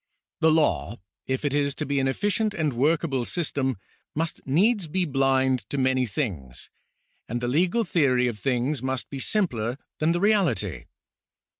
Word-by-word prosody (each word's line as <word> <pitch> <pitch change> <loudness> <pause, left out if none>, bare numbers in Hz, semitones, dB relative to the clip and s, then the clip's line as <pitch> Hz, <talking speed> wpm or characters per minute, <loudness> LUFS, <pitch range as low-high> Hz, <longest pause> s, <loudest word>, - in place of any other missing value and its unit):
The 160 - +4
law, 155 -7 +1 0.3
if 130 +2 -2
it 140 - 0
is 140 -1 +1
to 155 - -3
be 140 -1 0
an 135 - +1
efficient 205 - 0
and 155 -6 0
workable 140 0 +1
system, 135 - -1 0.4
must 160 +2 -2
needs 190 - +2
be 180 +4 0
blind 135 -3 +1
to 140 - -2
many 130 -1 +2
things, 90 - -4 0.6
and 120 +2 -2
the 120 - -2
legal 175 - +2
theory 135 - +2
of 115 -3 -4
things 130 +5 0
must 130 -1 -3
be 140 - -5
simpler 125 - 0 0.2
than 155 +2 +2
the 175 - 0
reality. 195 - +1
140 Hz, 160 wpm, -25 LUFS, 130-165 Hz, 0.6 s, The